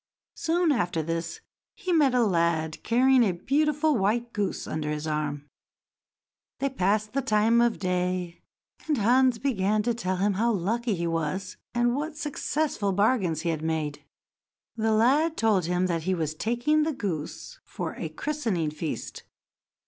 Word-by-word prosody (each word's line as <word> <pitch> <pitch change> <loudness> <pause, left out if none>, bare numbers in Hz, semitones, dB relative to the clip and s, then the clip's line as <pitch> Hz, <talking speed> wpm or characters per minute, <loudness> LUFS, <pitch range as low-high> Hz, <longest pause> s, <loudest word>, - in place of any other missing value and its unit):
Soon 335 0 +1
after 175 - 0
this, 165 +1 -4 0.3
he 370 -4 -2
met 285 -6 +4
a 245 - +4
lad 165 -4 0
carrying 255 +2 +4
a 205 -6 +3
beautiful 300 - +1
white 235 +3 0
goose 205 -2 -2
under 155 -1 -3
his 150 0 -3
arm. 150 -2 -2 1.1
They 275 - 0
passed 210 -1 0
the 275 - +1
time 225 +1 +3
of 235 -1 +2
day, 180 -1 -2 0.5
and 300 -3 +1
Hans 245 +3 +4
began 215 -4 0
to 240 +2 +1
tell 190 -5 -2
him 200 +2 +1
how 230 +4 +1
lucky 220 +4 -1
he 170 -1 -2
was, 165 +3 -2 0.2
and 240 0 +2
what 300 +2 -4
successful 295 -7 -1
bargains 195 - +1
he 170 - -1
had 160 -2 -2
made. 155 -2 -2 0.7
The 220 0 0
lad 280 +9 +3
told 210 -6 +2
him 180 +1 +1
that 170 -2 -1
he 185 +3 0
was 155 -3 -2
taking 240 - +1
the 310 +1 0
goose 200 - -5
for - - -5
a - - -5
christening 225 - -2
feast. 155 0 -5
210 Hz, 155 wpm, -27 LUFS, 170-255 Hz, 1.1 s, met